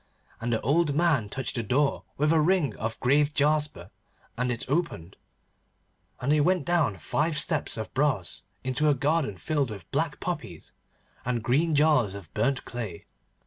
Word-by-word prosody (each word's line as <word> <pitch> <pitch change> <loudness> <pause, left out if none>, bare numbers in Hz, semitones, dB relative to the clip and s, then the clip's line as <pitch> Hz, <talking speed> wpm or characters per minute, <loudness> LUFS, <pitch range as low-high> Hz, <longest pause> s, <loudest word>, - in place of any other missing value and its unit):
And 120 +1 -2
the 110 - +1
old 150 +2 +2
man 155 -10 +2
touched 135 +4 -3
the - - +1
door 135 +6 +1
with 150 +3 +3
a 160 - +4
ring 175 -2 +2
of 110 +1 -4
graved 145 +3 +2
jasper 150 - 0 0.4
and 125 +1 0
it 120 - -3
opened, 135 - -2 1.0
and 130 +3 0
they 150 0 +4
went 180 -1 +2
down 155 - +1
five 150 - -1
steps 155 -4 0
of 110 - -5
brass 130 - 0 0.2
into 130 +4 +1
a 145 - +4
garden 145 - 0
filled 145 - -1
with 100 -6 -9
black - - -1
poppies - - -5 0.5
and 120 -2 -1
green 150 +7 +2
jars 145 -9 +3
of 95 -5 -10
burnt 125 +5 0
clay. 110 -9 -6
140 Hz, 165 wpm, -27 LUFS, 115-150 Hz, 1.0 s, a